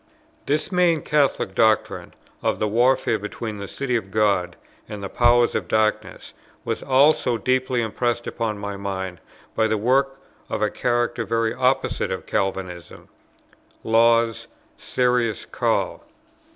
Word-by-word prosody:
This 155 +5 -1
main 175 -4 +2
Catholic 140 -9 +1
doctrine 110 +1 +1 0.3
of - - 0
the 110 - 0
warfare 120 +1 +2
between 105 +1 -6
the 100 - -6
city 130 +2 -2
of 110 -5 -2
God 95 -4 +1 0.3
and 105 -2 -7
the 100 - -4
powers 120 0 +3
of - - -2
darkness 110 0 -1 0.3
was - - -2
also 135 -2 +3
deeply 130 0 0
impressed 120 +2 -2
upon 110 -3 -3
my 100 -1 -5
mind 95 -2 -5 0.4
by 110 - +2
a 110 0 +1
work 135 +5 +1 0.3
of - - -2
a 105 -1 0
character 120 -1 -1
very 115 +1 0
opposite 130 +1 0
to - - -2
Calvinism, 90 -3 -4 0.7
Law's 115 0 +3 0.3
"Serious 125 -4 0
Call." - - -1
115 Hz, 135 wpm, -23 LUFS, 105-125 Hz, 0.7 s, powers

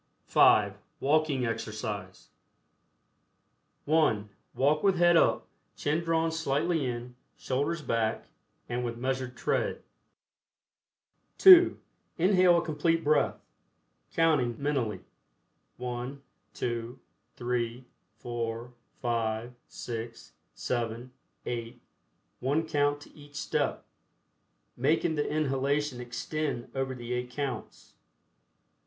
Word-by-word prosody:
(5) - - +4 0.2
WALKING 145 -2 +2
EXERCISE. 105 -4 -5 1.6
(1) 145 -10 +2 0.3
Walk 145 +3 +2
with 195 -2 +3
head 175 0 +5
up, - - +3 0.3
chin 155 +3 0
drawn 165 0 +1
slightly 160 -1 0
in, 120 0 -5 0.2
shoulders 145 +5 -1
back, 115 -3 0 0.4
and 120 +1 -2
with 120 -1 -3
measured 130 0 -3
tread. - - -1 1.5
(2) 365 -2 +9 0.4
Inhale 180 0 +5
a - - 0
Complete 165 +1 +1
Breath, 150 0 +3 0.8
counting 150 -8 +2
(mentally) 130 -9 -1 0.8
1, 125 +2 -5 0.4
2, 120 +1 -3 0.4
3, 120 0 -2 0.3
4, 120 0 -4 0.3
5, 115 0 -1
6, 115 -1 -7 0.2
7, 120 +1 -3 0.3
8, 115 -1 -5 0.6
one 145 +6 0
count 145 -1 +1
to - - -15
each 145 -1 -15
step, 155 - -1 0.9
making 155 +5 +2
the 150 -1 -1
inhalation 140 -2 0
extend 125 +2 -4
over 135 -1 -2
the 120 0 -5
eight 125 0 -2
counts. 130 -3 -5
130 Hz, 95 wpm, -29 LUFS, 120-155 Hz, 1.6 s, 2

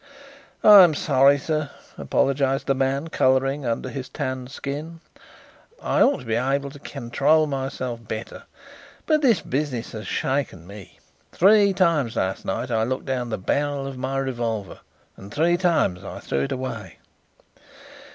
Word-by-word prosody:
"I'm 190 -7 +8
sorry, 140 0 +4
sir," 155 0 -2 0.3
apologized 135 0 0
the 135 - +2
man, 135 +4 -1
colouring 135 0 +1
under 115 +2 -2
his 130 0 -6
tanned 130 -1 -4
skin. 150 +4 -6 0.8
"I - - 0
ought 280 - +3
to - - -12
be 115 - -2
able 135 +4 0
to 145 - -12
control 140 +4 +1
myself 130 -5 -4
better. 110 +1 -6 0.6
But 310 -1 +2
this 240 -8 +3
business 130 -4 -3
has 110 -1 -7
shaken 135 - -2
me. 100 0 -12 0.3
Three 200 +2 +5
times 165 - +1
last 95 -3 -2
night 120 +6 -3
I 110 -1 +1
looked 130 +4 -2
down 125 -3 -2
the 110 - -2
barrel 140 +7 -1
of 135 -1 -6
my 130 +1 -3
revolver, 120 -6 -3 0.4
and 100 +1 -12
three 165 +4 +2
times 165 - +1
I - - -7
threw 70 0 -2
it - - -7
away.... 115 - -5
135 Hz, 150 wpm, -23 LUFS, 120-150 Hz, 0.8 s, I'm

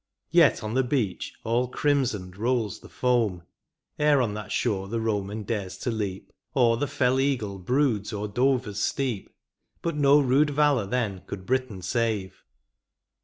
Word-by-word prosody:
Yet - - +5
on 110 +1 -3
the 130 - +3
beach 125 -7 -1
all 120 +3 +1
crimsoned 120 -10 0
rolls 115 0 -1
the - - -14
foam. 115 -8 +1 0.6
Ere 150 -1 +4
on 115 -5 0
that 105 0 -6
shore 100 -5 0
the 115 +3 -3
Boman 105 -1 -2
dares 100 -4 -3
to 125 - -2
leap, 100 -4 -4 0.2
Or 120 -3 +4
the 145 - -1
fell 130 -1 +1
eagle 115 -8 -1
broods 120 0 +1
o 105 -1 -4
er - - -2
Dover's 125 -2 0
steep. 125 -7 -1 0.5
But 165 -2 -1
no 145 0 +5
rude 140 +2 +3
valour 145 -7 +2
then 105 -5 -1
could 95 -2 -7
Britain 130 -7 -1
save. 105 -1 -1
115 Hz, 160 wpm, -26 LUFS, 105-130 Hz, 0.6 s, Yet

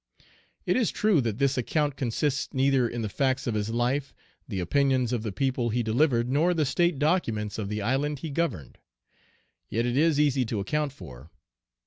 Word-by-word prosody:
It - - +1
is 245 -4 +2
true 210 -8 +2
that 115 -3 -2
this 135 -1 +1
account 145 +3 0
consists 135 +2 -1
neither 130 -2 +3
in 120 -1 -4
the - - -1
facts 130 +5 0
of 120 - -1
his 105 0 -1
life, 125 +4 -1 0.3
the 100 -5 -4
opinions 130 +5 +1
of 120 - -1
the 110 -2 -4
people 125 +1 -1
he 120 +2 0
delivered, 120 +1 +2
nor 160 +7 +2
the 155 -2 +1
State 170 +3 +1
documents 115 - 0
of 100 -2 -3
the 105 0 -3
island 140 +6 0
he 150 +3 -6
governed. 140 - -3 0.9
Yet 115 +3 0
it 120 0 -1
is 155 +1 +3
easy 140 -3 +3
to 110 -2 -3
account 150 +9 -1
for. 80 - -12
130 Hz, 185 wpm, -27 LUFS, 115-145 Hz, 0.9 s, neither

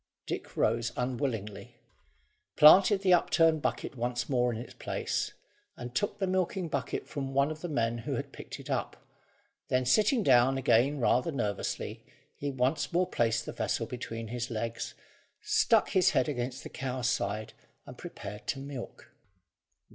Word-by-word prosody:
Dick - - -6
rose 115 +1 +1
unwillingly, 115 -6 -3 0.8
planted 190 +6 +7
the 185 -2 +5
upturned 165 -2 +3
bucket - - -2
once 120 0 -2
more 125 -3 +2
in 115 - -4
its 120 - -9
place, - - -3 0.4
and 120 0 -7
took 205 +9 -1
the 200 - 0
milking 185 -1 -1
bucket 140 -3 -3
from 135 -2 -5
one 140 +2 +3
of 155 0 -7
the 175 - -4
men 115 -5 0
who 115 - -3
had - - -5
picked - - -9
it - - -10
up. - - -3 0.6
Then, 125 0 +1
sitting 215 - +3
down 130 -1 +5
again 135 +3 +3
rather 125 +5 +2
nervously, 105 -8 -3 0.3
he 145 - -3
once 130 +3 0
more 180 +2 +2
placed 115 -7 0
the - - -5
vessel - - -1
between 115 -2 -6
his 120 +1 -3
legs, 115 0 -4 0.4
stuck 425 - +3
his 185 -2 +4
head - - +2
against 125 -2 -3
the - - -7
cow's 130 -2 -3
side, 105 -1 -1 0.3
and - - -10
prepared 105 +3 -9
to - - -1
milk. 135 -3 -8
130 Hz, 160 wpm, -30 LUFS, 120-155 Hz, 0.8 s, planted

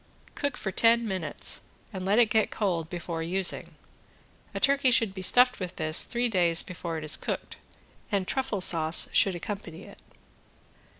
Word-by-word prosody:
Cook 285 -2 -4
for 195 - -5
ten 230 +2 +2
minutes 185 -7 -3 0.3
and 190 -1 -6
let 200 +3 0
it 235 -3 +3
get 220 -1 +1
cold 170 -6 -3
before 170 -2 -6
using. 180 +3 -1 0.8
A - - -6
turkey 275 -1 +2
should 225 -5 +1
be 190 - -8
stuffed 250 +6 +3
with 180 -2 -7
this 155 0 +2
three 240 +1 -2
days 175 -6 +1
before 170 -2 -7
it 155 - -7
is 155 - 0
cooked, - - -6 0.5
and 195 -3 -2
truffle 265 -7 -3
sauce 165 -2 +7
should 195 -2 +2
accompany 180 -2 -8
it. - - -15
190 Hz, 165 wpm, -26 LUFS, 170-230 Hz, 0.8 s, sauce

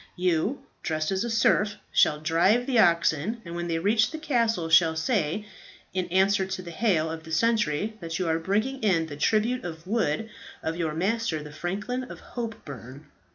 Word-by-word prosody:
You, 180 - 0 0.2
dressed 155 0 -1
as 190 +2 0
a 235 - -2
serf, 215 -2 +2 0.2
shall 150 - +4
drive 170 +10 +3
the 250 -3 +2
oxen, 170 +4 +3
and 170 - -7
when 175 0 -3
you 165 -1 0
reach 215 +3 +3
the 315 - -6
castle 230 - 0
shall 165 0 +5
say, 180 - 0 0.5
in 185 -1 -1
answer 190 +2 +3
to 190 -1 -4
the 170 - -8
hail 165 -4 +1
of 160 0 -6
the 160 - -10
sentry, 210 0 +1
that 165 -1 -4
you 185 -3 -1
are 160 0 +1
bringing 215 +10 -1
in 185 -7 +2
the 150 -2 -7
tribute 220 +10 +1
of 165 -1 -7
wood 215 -2 0 0.4
of 160 - -2
your 160 -3 -2
master 190 -3 -1
the 150 - -9
franklin 210 +11 -3
of - - -10
Hopeburn. 145 - -7
180 Hz, 185 wpm, -26 LUFS, 160-220 Hz, 0.5 s, shall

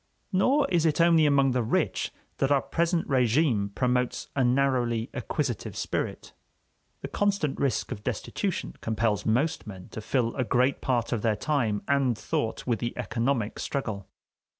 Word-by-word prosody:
Nor 270 +9 +3
is 165 -2 +3
it 155 - 0
only 165 -2 +5
among 140 -2 +4
the 125 0 +1
rich 115 - 0 0.3
that 135 - +1
our 140 -1 +3
present 170 0 0
régime 125 -5 +2
promotes 125 -1 0
a 135 - +2
narrowly 125 -2 +1
acquisitive 135 -8 -3
spirit. - - -3 0.7
The - - -4
constant 200 -8 0
risk 135 -4 0
of 105 - -5
destitution - - -3
compels 110 -2 0
most 125 +5 +1
men 95 -3 -9
to 110 - -7
fill 115 +1 0
a 130 - 0
great 125 +3 +1
part 120 -3 0
of 115 -4 0
their 110 -1 +2
time 115 -4 0
and 135 -5 +2
thought 110 - -2
with 120 -4 0
the 120 - -3
economic 120 -1 -1
struggle. 105 -8 -3
125 Hz, 155 wpm, -27 LUFS, 115-140 Hz, 0.7 s, only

